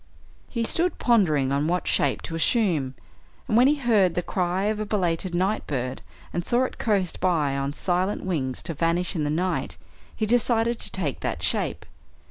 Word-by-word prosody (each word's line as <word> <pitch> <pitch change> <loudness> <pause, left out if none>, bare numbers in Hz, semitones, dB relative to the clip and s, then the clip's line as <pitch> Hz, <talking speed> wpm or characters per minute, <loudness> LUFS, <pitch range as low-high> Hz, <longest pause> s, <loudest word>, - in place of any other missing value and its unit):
He 235 -2 -2
stood 345 +9 +1
pondering 155 - +3
on 140 +2 +1
what 180 +2 -1
shape - - +1
to - - -6
assume, 165 - +1 0.5
and 215 - 0
when 245 +3 +6
he 295 - +4
heard 220 - +2
the 175 - 0
cry 180 +2 -1
of 210 +1 0
a 215 - -2
belated 180 -3 -1
night 190 +5 0
bird, 130 -2 -3 0.3
and 175 - -1
saw 240 +7 +2
it 255 - -4
coast 195 -6 0
by 155 -7 +1
on 140 0 -1
silent 180 +5 -1
wings 135 -9 -2
to 165 - -4
vanish 170 +4 0
in 155 -3 0
the - - 0
night, 180 +5 -1 0.4
he 220 - -1
decided 235 0 +2
to - - -5
take 170 -9 -2
that - - -3
shape. - - -1
180 Hz, 185 wpm, -25 LUFS, 155-215 Hz, 0.5 s, when